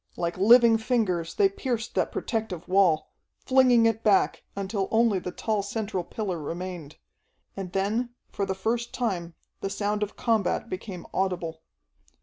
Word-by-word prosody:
Like 170 0 -1
living 230 +3 +6
fingers 210 -8 0
they 400 - +5
pierced 250 - -3
that - - 0
protective 215 -7 -3
wall, 180 -5 +3 0.3
flinging 255 -3 +5
it 225 -1 +1
back, 205 -3 +3
until 195 0 -2
only 225 -3 +3
the 180 - -5
tall 215 +1 -1
central 200 -2 -3
pillar 185 -2 -4
remained. 170 -1 -6 0.6
And 190 -2 -5
then 210 +6 0 0.2
for 200 - -2
the 190 - -1
first 230 +5 -2
time 175 -9 -2 0.2
the 195 - -3
sound 205 +1 -1
of 210 -1 -3
combat 225 -1 0
became 185 -1 -6
audible. 175 -4 -2
200 Hz, 145 wpm, -27 LUFS, 180-225 Hz, 0.6 s, living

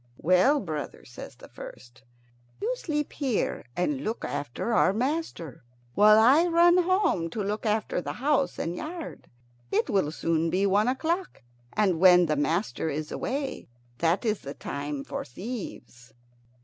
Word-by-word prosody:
"Well, 185 - +4
brother," 155 - -6
says 120 +1 -10
the - - -14
first, 120 +1 -12 0.6
"you 475 +4 -1
sleep 300 - -3
here 260 - -1
and 265 +10 0
look 225 -1 -3
after 145 - -3
our 190 - +4
master, 250 - -3 0.3
while 215 +2 +6
I 270 +10 +6
run 345 +1 +5
home 360 - +1
to 210 +5 -4
look 210 +3 -2
after 210 -4 0
the - - -5
house 275 +1 0
and 170 - -3
yard. 325 - -7 0.4
It - - +1
will 190 -7 +1
soon 165 0 0
be 190 +4 +1
one 205 +3 +3
o'clock, 325 - -2 0.3
and 190 -6 +1
when 180 -1 +7
the 155 -2 0
master 160 - -1
is 155 +1 -4
away 275 +1 -4 0.3
that 170 +6 +1
is 215 -2 0
the 140 +1 -8
time 145 0 -5
for - - -5
thieves." 125 - -8
205 Hz, 150 wpm, -27 LUFS, -, 0.6 s, when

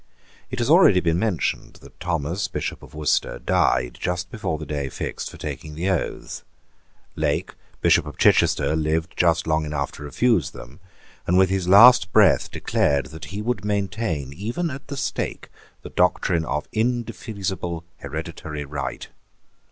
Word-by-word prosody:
It 130 - -5
has 120 - 0
already 155 - +6
been 85 -1 +1
mentioned 100 -5 -1
that - - -16
Thomas, 85 +3 -2
Bishop 95 - -4
of - - -14
Worcester, 75 -5 0
died 60 0 +1
just 90 +1 -2
before 95 -8 -3
the 75 - -7
day 70 -3 -3
fixed - - -5
for - - -12
taking 75 -1 -6
the 90 +5 0
oaths. 90 - -3 0.7
Lake, - - -1 0.3
Bishop - - +4
of - - -9
Chichester, 80 - +3
lived 80 +1 -1
just 85 -1 +2
long 80 0 +1
enough 75 -2 -2
to - - -12
refuse 85 - +1
them, 65 +6 -12 0.5
and 90 - +3
with 95 0 +4
his 95 -2 -1
last 110 +2 +8
breath - - +4
declared 70 -1 0
that 80 0 -8
he 95 +7 -6
would 120 -3 -2
maintain 100 - -2
even 120 - -3
at 140 0 -8
the 140 - -6
stake - - -3 0.3
the - - -9
doctrine 90 -2 +1
of 75 -1 -2
indefeasible 105 -7 -2 0.2
hereditary 75 -2 -6
right. 70 -2 -5
90 Hz, 155 wpm, -23 LUFS, 75-105 Hz, 0.7 s, last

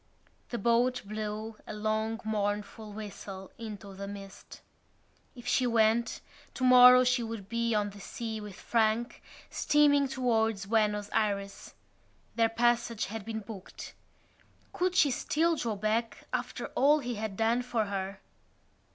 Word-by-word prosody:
The 240 - -3
boat 240 +3 +2
blew 215 +1 -5
a - - -5
long 220 +1 -1
mournful 210 0 -2
whistle 200 -2 -8
into 210 -3 -8
the 200 +1 -7
mist. 200 -1 -10 0.7
If 245 -1 -12
she 250 +1 +2
went, 230 0 +2 0.3
tomorrow 250 0 +8
she 250 0 +2
would 225 -4 -6
be 235 0 0
on 205 -1 0
the 200 - -12
sea 220 +1 -5
with 205 -3 -8
Frank, 230 +1 0 0.3
steaming 285 -1 +3
towards 225 -6 0
Buenos 210 -1 +1
Ayres. 200 -2 -2 0.6
Their 230 -1 +3
passage 235 -1 +1
had 225 -2 -5
been 220 -1 -4
booked. 200 -3 -9 0.8
Could 365 0 0
she 295 -6 +5
still 325 +6 +1
draw 230 -7 -2
back 215 +2 -1
after - - -3
all 290 +3 +5
he 245 -4 -3
had 215 -3 -4
done 230 +2 +2
for 240 -3 -1
her? 195 -1 -4
225 Hz, 135 wpm, -30 LUFS, 210-240 Hz, 0.8 s, tomorrow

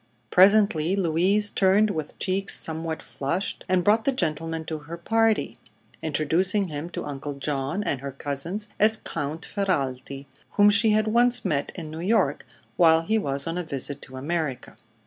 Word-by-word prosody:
Presently 190 -3 +5
Louise 195 +4 +2
turned 205 +2 +3
with 155 -5 -5
cheeks 195 +1 -1
somewhat 160 0 -4
flushed 165 +8 -3
and 185 -1 +2
brought 215 +3 +3
the 275 - +2
gentleman 165 - -2
to 160 -1 -4
her 160 +3 -8
party, 225 +5 +1 0.4
introducing 175 +6 +1
him 150 +2 -5
to - - -5
Uncle 145 0 -5
John 140 +6 -2
and 140 -9 -2
her 140 0 -5
cousins 145 - -4
as 220 +1 +4
Count 155 -4 -5
Ferralti, 140 -8 -2 0.3
whom 205 0 +6
she 210 +2 +4
had 215 0 +3
once 240 +1 +3
met 145 -6 -1
in 160 -4 -7
New 160 - -7
York 205 +7 +1 0.3
while 165 -2 +5
he 220 +5 +1
was 140 -6 -2
on 165 +2 -2
a - - -2
visit 140 -2 -3
to 130 - -9
America. 150 -1 -3
170 Hz, 165 wpm, -25 LUFS, 150-205 Hz, 0.4 s, whom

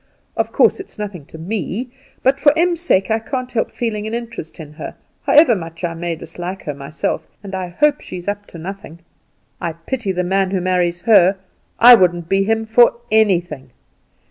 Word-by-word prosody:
"Of - - -1
course - - +3
it's 390 - -10
nothing 200 -8 -6
to - - -11
me; 205 - -4 0.3
but 270 +2 +3
for 295 +1 +4
Em's 345 0 +2
sake 205 - +2
I 220 - +2
can't 255 +2 -4
help 225 - 0
feeling 215 -3 -3
an 220 - -3
interest 230 -10 -7
in 150 -2 -9
her, - - -8 0.3
however 300 -5 +6
much 165 -2 -8
I 170 -1 -1
may 170 0 -3
dislike 180 +4 -7
her 150 - -4
myself; 140 +3 -4 0.2
and 195 -1 -8
I 185 -1 -3
hope 295 +11 +1
she's 180 0 -8
up 205 0 -3
to - - -11
nothing. 170 -1 -8 0.6
I 170 - -2
pity 200 +6 -4
the 180 -1 -1
man 190 +1 +1
who 190 0 -1
marries 175 -1 0
her; 200 -3 +5 0.4
I 245 +2 +10
wouldn't 175 -5 +3
be 195 0 +3
him 225 +2 0
for 235 +2 +5 0.2
anything. 175 -11 +1
195 Hz, 190 wpm, -19 LUFS, 175-225 Hz, 0.6 s, I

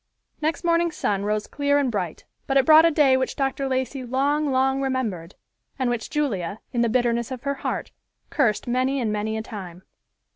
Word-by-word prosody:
Next 310 +2 -1
morning's 340 -1 +1
sun 200 -1 -1
rose 210 0 -1
clear 285 0 +1
and 275 -4 +1
bright, 180 -7 -4 0.2
but 275 - +2
it 270 - +4
brought 315 +1 +8
a - - +4
day 295 -4 +4
which 260 0 -1
Dr. 270 0 -1
Lacey 260 0 -2
long, 280 +4 0
long 265 +1 +2
remembered, 225 -11 -2 0.4
and 255 -3 0
which 235 -2 -3
Julia, 210 - -2
in 240 - +1
the 235 - +2
bitterness 235 -1 +1
of 255 -2 -7
her 280 0 0
heart, - - -3 0.4
cursed 235 -8 +1
many 255 +3 +1
and 225 -4 -1
many 215 +1 -2
a 220 - -4
time. 185 -5 -9
260 Hz, 190 wpm, -24 LUFS, 220-280 Hz, 0.4 s, brought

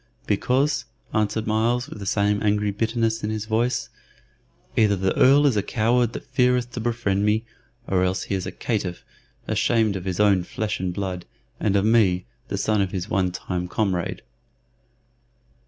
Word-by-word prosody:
"Because," 130 +6 +1 0.3
answered 110 +1 0
Myles, 115 +3 +1
with - - -9
the 100 - -6
same 105 +1 +1
angry 105 -1 +1
bitterness 115 +1 -1
in 105 - -1
his 110 -1 -3
voice, 115 +3 0 0.9
"either 105 -2 +4
the 95 0 0
Earl 140 +3 +6
is 135 -5 +3
a 105 - +2
coward 115 +3 +1
that - - -7
feareth 125 -1 +1
to 125 - -5
befriend 110 -4 0
me, 110 +2 +1 0.4
or 95 -1 +1
else 95 0 0
he - - -4
is 95 -2 -2
a - - -4
caitiff, 100 -7 -3 0.4
ashamed 110 -4 +2
of 95 -1 -5
his 95 -1 -3
own 100 -3 +4
flesh 105 +3 -3
and 90 0 -1
blood, 90 -1 -4 0.3
and 100 -2 +1
of 100 0 +3
me, 105 - +3 0.2
the - - -3
son 105 -2 +1
of 95 - 0
his 95 +2 -4
one 95 -2 +1
time 90 0 -4
comrade." 95 -3 -1
105 Hz, 170 wpm, -24 LUFS, 95-115 Hz, 0.9 s, Earl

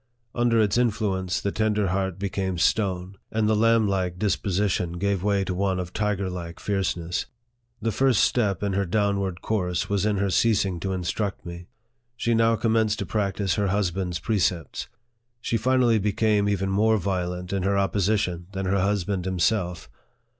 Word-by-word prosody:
Under 120 -1 +2
its 105 +2 +2
influence, 100 -6 0
the 100 - -2
tender 105 -2 +1
heart 95 -1 -1
became 95 -2 -2
stone, 95 0 0
and 110 -1 +1
the 110 - +3
lamblike 105 -5 +2
disposition 95 -2 0
gave 100 +1 -1
way 100 0 +1
to 95 - -3
one 95 0 0
of 90 -1 -5
tiger 105 -2 -1
like 85 -2 -6
fierceness. 90 -3 -2 0.6
The 115 - +1
first 125 0 +3
step 105 -6 +1
in 100 -1 0
her 100 0 0
downward 100 -2 0
course 90 -5 -1
was 100 -1 +1
in 105 -1 +1
her 100 0 0
ceasing 100 -4 +2
to 95 +2 -3
instruct 95 +3 -3
me. 85 0 -8 0.5
She 115 - 0
now 115 0 +3
commenced 110 -1 +1
to - - -3
practise 100 -3 -1
her 100 -1 +1
husband's 95 -2 -1
precepts. 90 -4 -1 0.5
She 115 - -2
finally 120 -1 +3
became 105 0 +1
even 95 -1 0
more 110 +3 +3
violent 90 -1 -3
in 100 - 0
her 100 +2 +1
opposition 95 -3 0
than 95 0 -3
her 95 +1 +1
husband 95 -1 0
himself. 90 -1 0
100 Hz, 160 wpm, -25 LUFS, 90-105 Hz, 0.6 s, the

